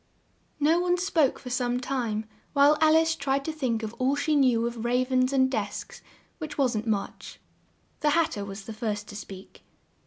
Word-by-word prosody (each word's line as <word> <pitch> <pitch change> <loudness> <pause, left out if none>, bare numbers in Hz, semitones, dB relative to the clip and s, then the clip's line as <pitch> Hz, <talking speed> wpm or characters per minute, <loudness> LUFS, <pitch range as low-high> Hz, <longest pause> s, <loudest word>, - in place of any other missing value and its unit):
No 315 +4 +3
one 355 0 +1
spoke 330 -6 +1
for 250 - -9
some 245 -1 0
time, 240 -5 -2 0.3
while 285 +1 +6
Al 315 0 +6
ice 325 0 +3
tried 275 -1 -1
to 320 - -1
think 245 -7 -1
of 220 0 -4
all 260 +2 +2
she 300 +2 0
knew 250 -5 +3
of 235 -1 -4
rav 250 +2 0
ens 255 0 +3
and 265 -1 +3
desks, 265 +2 -4 0.4
which 310 -1 -6
wasn't 240 -5 0
much. 205 -3 -3 0.6
The 300 - +2
Hat 325 +2 +2
ter 205 - -4
was 195 0 -8
the 225 - -7
first 210 -1 -3
to 205 - -9
speak. 195 -2 -10
255 Hz, 190 wpm, -27 LUFS, 225-295 Hz, 0.6 s, while